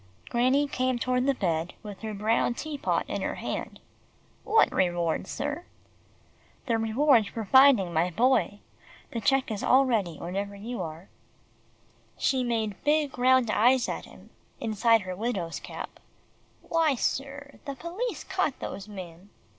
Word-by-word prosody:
Granny 260 +4 +2
came 255 -2 0
toward 250 +2 0
the 275 - +3
bed 170 -5 -1
with 205 -2 -9
her 220 -1 -4
brown 225 +3 +1
tea 310 +2 -5
pot 280 - 0
in - - -3
her - - -2
hand. - - -5 0.6
"What 445 +1 +4
reward, 175 -1 0
sir?" 295 +4 -4 1.0
"The 230 -4 +1
reward 225 0 +3
for 225 +1 -5
finding 260 -7 +6
my 170 +2 +2
Boy. 210 -1 +1 0.5
The 230 - -3
cheque 270 +1 +2
is 210 - -3
all 270 +2 +5
ready 200 - 0
whenever 200 +3 -4
you 230 +5 -5
are." 160 +3 -7 1.1
She 260 -2 +1
made 220 -4 -2
big 295 -3 +1
round 255 -2 +4
eyes 245 +4 +4
at - - -4
him, - - -16 0.3
inside 225 +1 +3
her 185 -1 -5
widow's 190 -6 -3
cap. - - -8 0.6
"Why, 325 -4 +2
sir, 280 +3 -3
the 280 - -5
police 365 - -4
caught 375 -8 -1
those 195 +1 -6
men." 185 -2 -10
235 Hz, 145 wpm, -27 LUFS, 200-270 Hz, 1.1 s, finding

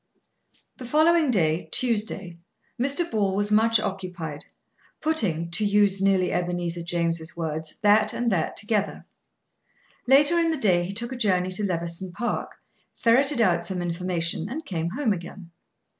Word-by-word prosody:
The 255 - -8
following 315 +3 +3
day, 165 -6 +1
Tuesday, 210 -7 0 0.4
Mr. 280 +6 +2
Ball 200 -3 0
was 205 +1 0
much 225 +1 +4
occupied, 180 -7 -5 0.5
putting, 180 - -1
to 180 +6 +2
use 205 -1 +3
nearly 195 -2 +2
Ebenezer 175 -1 -2
James' 170 -1 -2
words, 160 -1 -4
that 210 +1 +4
and 240 -1 -1
that 170 -5 -1
together. 210 -1 -2 1.0
Later 290 +6 +5
in 335 -1 +2
the 320 - -1
day 180 -8 +2
he 190 - -5
took 235 +3 -5
a - - -4
journey 185 -6 +1
to 190 +3 -2
Levison 170 -1 -3
Park, 240 +5 -3 0.4
ferreted 255 +3 +3
out 170 -5 +2
some 190 -2 -3
information, 175 0 -2
and 305 +4 -6
came 170 - -3
home 230 +2 0
again. 175 0 -9
195 Hz, 145 wpm, -25 LUFS, 170-230 Hz, 1.0 s, Later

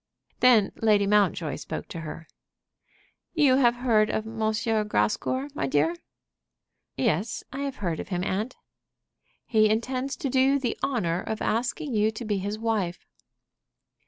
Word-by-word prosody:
Then 235 -5 +5
Lady 210 -2 +3
Mountjoy 195 -6 +2
spoke - - -6
to 165 - -6
her. 165 0 -8 1.1
"You 280 -5 +5
have 240 -3 +4
heard 225 -4 +2
of 215 - -1
M. 225 0 -8 0.5
Grascour, 210 - 0
my 140 - -2
dear?" 150 +5 +2 1.0
"Yes; 185 - 0
I 270 - -5
have 280 -1 -3
heard 170 -5 -3
of - - -5
him, 180 -2 -2
aunt." 210 +7 -2 0.9
"He 215 -2 +3
intends 255 +5 -1
to 325 - -3
do 260 - +2
you 270 +1 +4
the 245 -4 -1
honor 180 -10 0
of 220 +1 -4
asking 250 +5 -1
you 215 0 +3
to 230 +2 -6
be 205 -2 0
his 205 +3 -3
wife." 215 -6 -2
215 Hz, 150 wpm, -26 LUFS, 190-255 Hz, 1.1 s, Then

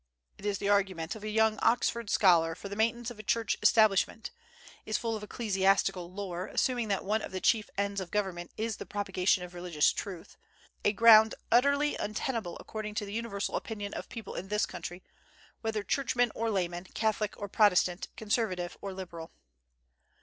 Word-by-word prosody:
It 205 - -5
is 200 -1 0
the 200 - -3
argument 190 -5 +1
of 215 - -10
a 215 - -3
young 220 0 +2
Oxford 235 -2 +1
scholar 165 -5 +4
for 200 - -8
the 200 - -5
maintenance 230 +2 0
of 225 - -12
a - - -7
Church 225 0 +1
establishment; 215 0 +3 0.5
is 215 - -1
full 230 -1 -2
of 215 - -5
ecclesiastical 195 -4 +1
lore, 185 -2 -5
assuming 245 -3 0
that 200 -2 -1
one 215 +2 +1
of - - -6
the 190 - -3
chief 215 +2 +2
ends 200 0 -1
of 180 - -6
government 185 -4 -2
is 220 0 -2
the - - -8
propagation 195 -2 0
of 180 0 -9
religious 175 -4 +1
truth, 185 -5 -7 0.5
a 205 - +4
ground 220 0 +7 0.2
utterly 280 +5 +3
untenable 215 -3 -3
according 215 -1 -6
to 210 -2 -1
the 200 - -8
universal 220 -3 -3
opinion 205 -3 -4
of - - -6
people 225 -4 -7
in 185 - -5
this 210 +1 +1
country, 175 +1 -8 0.6
whether 220 -2 -2
churchmen 245 -1 +1
or 230 0 -1
laymen, 175 -3 -2
Catholic 215 -1 0
or 205 - -5
Protestant, 185 -3 +3
Conservative 205 -5 -1
or 195 -1 -5
liberal. 170 -3 -8
205 Hz, 180 wpm, -30 LUFS, 185-220 Hz, 0.6 s, ground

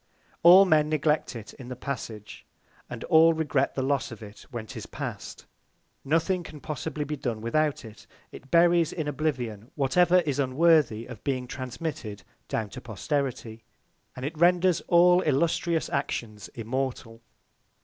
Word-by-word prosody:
All 180 +3 +9
Men 155 -4 +3
neglect 150 -2 0
it 110 -3 -9
in 125 - -11
the 125 - -6
Passage; 115 -5 -7 0.5
and 120 -2 -7
all 165 0 +5
regret 150 -4 0
the 130 - -1
Loss 135 0 -1
of 115 -1 -9
it 105 0 -13
when 120 -3 -6
'tis - - -8
past. - - -7 0.6
Nothing 165 +5 +1
can 155 -3 -10
possibly 150 0 -4
be 150 +1 -4
done 120 -5 -3
without 140 +5 0
it; 110 -1 -13 0.2
it 135 - -13
buries 170 0 +4
in 155 -4 -4
Oblivion 125 -7 -3
whatever 175 +6 +3
is 145 -4 -2
unworthy 140 -4 +3
of 120 -4 -11
being 130 -3 -2
transmitted 125 -4 -6 0.2
down 110 -3 -3
to - - -8
Posterity; 120 -1 -3 0.5
and 125 - -6
it 155 +3 -4
renders 175 +2 +3
all 180 +1 +5
illustrious 160 +2 0
Actions 110 -7 -4
immortal. 115 -1 -4
140 Hz, 150 wpm, -27 LUFS, 120-160 Hz, 0.6 s, All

